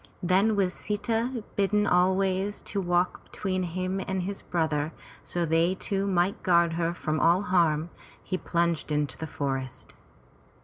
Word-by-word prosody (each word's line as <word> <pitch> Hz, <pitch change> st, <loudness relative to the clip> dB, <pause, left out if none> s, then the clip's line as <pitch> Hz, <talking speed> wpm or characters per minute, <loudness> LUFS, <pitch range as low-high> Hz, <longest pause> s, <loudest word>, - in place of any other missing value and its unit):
Then 195 Hz, +5 st, +3 dB
with 190 Hz, -3 st, +1 dB
Sita 225 Hz, +3 st, -2 dB
bidden 205 Hz, +1 st, +2 dB
always 190 Hz, +2 st, +2 dB
to 200 Hz, -, -3 dB
walk 175 Hz, 0 st, 0 dB
between 185 Hz, -2 st, -2 dB
him 185 Hz, +2 st, -2 dB
and 190 Hz, -1 st, -1 dB
his 200 Hz, +2 st, -4 dB
brother, 160 Hz, -2 st, -1 dB, 0.4 s
that 170 Hz, -2 st, 0 dB
they 165 Hz, +3 st, +3 dB
two 195 Hz, +1 st, -1 dB
might 185 Hz, 0 st, +1 dB
guard 170 Hz, -2 st, +3 dB
her 165 Hz, 0 st, 0 dB
from 155 Hz, -3 st, -2 dB
all 175 Hz, +5 st, +4 dB
harm, 170 Hz, -4 st, +2 dB, 0.3 s
he 185 Hz, -, -2 dB
plunged 170 Hz, -3 st, 0 dB
into 150 Hz, -1 st, 0 dB
the 160 Hz, -, -6 dB
forest. 135 Hz, -3 st, -4 dB
180 Hz, 145 wpm, -27 LUFS, 165-195 Hz, 0.4 s, all